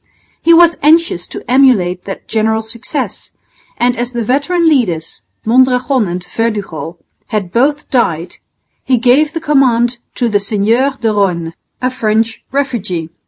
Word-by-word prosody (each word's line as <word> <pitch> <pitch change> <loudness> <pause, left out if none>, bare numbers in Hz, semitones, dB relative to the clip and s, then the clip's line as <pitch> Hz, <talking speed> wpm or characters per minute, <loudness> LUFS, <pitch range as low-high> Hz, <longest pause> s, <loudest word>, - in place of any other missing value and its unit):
He 335 - +3
was 340 0 +6
anxious 305 - +2
to - - -8
emulate 235 -9 +3
that 195 - -7
general's 220 0 -1
success, 235 +1 -5 0.5
and 245 0 +1
as 240 +1 -4
the 240 -1 -2
veteran 290 +9 +1
leaders, 185 - 0 0.2
Mondragon 255 0 +2
and 180 +1 -5
Verdugo, 200 -7 -3 0.3
had 205 -6 -3
both 285 +6 +1
died, 175 - 0 0.5
he 255 - +2
gave 265 +6 +3
the 330 - -2
command 250 -6 +2 0.2
to 245 - 0
the 210 -3 +1
Seigneur 225 +7 0
de 225 - 0
Rosne, 175 -5 0 0.3
a 255 - +1
French 225 -2 -1
refugee. 215 - -2
235 Hz, 140 wpm, -14 LUFS, 200-265 Hz, 0.5 s, was